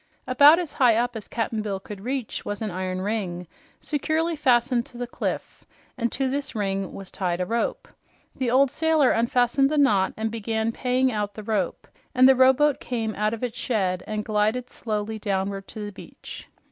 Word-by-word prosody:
About 285 +5 +7
as 345 -4 -3
high 245 -4 +4
up 240 +1 0
as 220 - -7
Cap'n 225 -1 -2
Bill 200 -2 -3
could 195 0 -9
reach 255 +1 -3
was 205 -1 -4
an 215 -3 -3
iron 185 0 -3
ring 190 -4 -3 0.3
securely 320 +3 -1
fastened 250 -4 +2
to 245 - -13
the 245 - -3
cliff, 240 - -5 0.3
and 235 -3 -1
to 270 0 -1
this 275 0 -3
ring 195 -2 -2
was 195 -1 -9
tied 180 -2 -2
a 180 - 0
rope. 230 +4 -2 0.5
The 255 -2 -1
old 260 +2 +4
sailor 320 -4 +3
unfastened 245 +3 +2
the 305 - -1
knot 205 -10 +3
and 220 0 -2
began 220 0 -1
paying 255 +2 +1
out 205 -2 -3
the 215 - -7
rope, 205 -4 -2 0.3
and 255 +1 +7
the 265 - +8
rowboat 265 +3 +4
came 225 -3 -3
out 215 +2 0
of 230 - -10
its 240 -1 -3
shed 185 -6 -1
and 215 -1 -3
glided 215 +4 0
slowly 215 0 -3
downward 195 -1 -2
to 215 -1 -7
the 205 - -6
beach. 195 - -11
225 Hz, 190 wpm, -25 LUFS, 205-255 Hz, 0.5 s, the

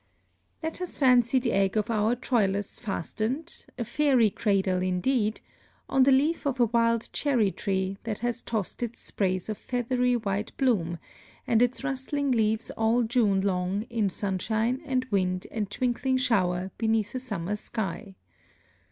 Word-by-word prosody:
Let 320 +3 -4
us 360 - -2
fancy 250 -2 +4
the 250 -2 +1
egg 195 +1 +2
of 215 +2 0
our 220 +2 +2
Troilus 205 -5 0
fastened 235 - -3
a 240 - -1
fairy 245 -3 +3
cradle, 190 -4 +1
indeed 210 +5 0 0.5
on 270 - +2
the 270 +1 +6
leaf 290 +4 +2
of 265 -2 -1
a 240 - +6
wild 230 0 +1
cherry 245 -9 +2
tree 190 0 -2
that 220 -3 -3
has 240 0 -1
tossed 220 -2 -3
its 240 -1 -4
sprays 185 -2 -1
of 215 -2 -4
feathery 250 0 0
white 210 -2 -3
bloom, 190 -11 +1 0.5
and 225 0 +3
its 245 +2 +1
rustling 280 +1 -1
leaves 220 -1 +1
all 225 +2 +2
June 220 -5 +2
long 190 +1 0
in 220 -4 +1
sunshine 220 +7 -1
and 255 -2 0
wind 185 -2 0
and 210 -3 -2
twinkling 255 +3 0
shower 190 -7 +1
beneath 220 -2 +1
a 255 - -2
summer 205 -6 -3
sky. 200 -2 -5
225 Hz, 150 wpm, -27 LUFS, 195-250 Hz, 0.5 s, the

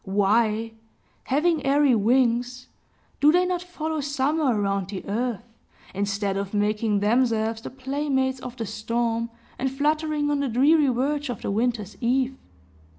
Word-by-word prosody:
Why, 215 +3 +1 0.5
having 305 +3 +1
airy 280 -1 +4
wings, 245 +2 +1 0.5
do 295 +1 +6
they 360 +2 +3
not 360 -1 -1
follow 320 -3 -4
summer 285 +2 0
around 195 -2 -1
the 195 -1 -6
earth, 230 +1 -2 0.5
instead 200 0 -1
of 200 +1 -4
making 210 0 +1
themselves 225 0 +1
the - - -7
playmates 265 0 -1
of 255 -1 -8
the 225 - -3
storm, 230 +2 -2 0.3
and 265 - 0
fluttering 300 +2 0
on 290 - +1
the 280 -2 -1
dreary 285 +6 +4
verge 275 +3 0
of 245 - -5
the - - -1
winter's 220 -1 -1
eve? 260 +2 +1
250 Hz, 145 wpm, -24 LUFS, 215-285 Hz, 0.5 s, do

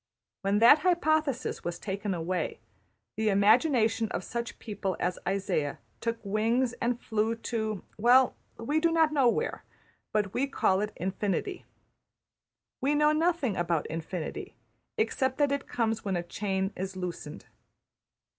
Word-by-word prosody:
When 200 +1 +1
that 235 +7 +8
hypothesis 310 -5 +1
was 175 0 -3
taken 195 0 -3
away, 175 +2 -2 0.6
the 220 0 +2
imagination 225 +2 +3
of 185 - -3
such 235 +3 -4
people 200 -4 -4
as 180 +1 -1
Isaiah 190 -7 -1 0.2
took 230 0 -2
wings 225 +5 +1
and 240 0 0
flew 220 0 0
to 220 -3 -3 0.2
well 250 +3 +5 0.2
we 290 +7 0
do 335 +1 +2
not 320 -2 +3
know 270 -5 +4
where, - - -2 0.5
but 205 -2 0
we 275 +3 +1
call 195 -8 +2
it 210 0 -2
Infinity. 200 - -2 1.2
We 280 +3 +2
know 300 0 +4
nothing 310 - +1
about 170 -2 0
Infinity; 165 0 -5 0.4
except 265 -12 0
that 290 -1 +2
it 280 -1 -2
comes 225 -2 -1
when 195 -3 -1
a 175 - -1
chain 195 +2 -2
is 190 +1 -4
loosened. 175 -5 -6
220 Hz, 140 wpm, -29 LUFS, 190-265 Hz, 1.2 s, that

